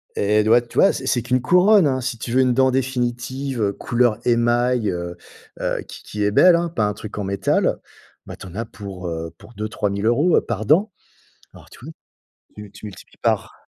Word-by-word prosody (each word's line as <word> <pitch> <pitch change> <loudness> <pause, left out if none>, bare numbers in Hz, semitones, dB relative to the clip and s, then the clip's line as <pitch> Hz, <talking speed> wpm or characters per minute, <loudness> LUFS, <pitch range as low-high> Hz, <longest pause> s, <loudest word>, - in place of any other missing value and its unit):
Et 105 +1 +2
du 110 - -1
vois 120 +1 +6
tu 120 - -13
vois? 195 - +5
C'est - - -6
c'est 120 - +1
qu'une 125 0 0
couronne, 180 +4 +5
hein, 130 -1 0
si 125 -1 -3
tu 120 - -6
veux 130 - +3
une 125 -1 +2
dent 130 +1 +3
définitive, 130 0 -2
heu, 100 -1 +1
couleur 120 -3 0
émail, 120 -1 +2
heu, 85 0 -5 0.4
heu, - - -2
qui - - -11
qui 105 0 -4
est 105 - +1
belle, 175 - +6
hein, 170 0 0
pas 110 -10 -1
un 105 - -1
truc 105 0 -9
en 105 - -2
métal. 100 0 0 0.5
Bah, - - -8
tu - - -12
en 90 - -12
as 115 - -2
pour, 95 -4 -8
heu, 80 -1 -5
pour 105 +4 -16
2-3000 105 -1 -3
euros, 145 +10 +3
heu, - - +3
par 110 -2 -4
dent. 195 - +3 0.6
Alors, - - -15
tu - - -15
vois? 160 - -8 0.6
Tu 105 -1 -10
tu 105 +1 -14
multiplies 100 - -13
par - - 0
120 Hz, 220 wpm, -21 LUFS, 105-130 Hz, 0.6 s, vois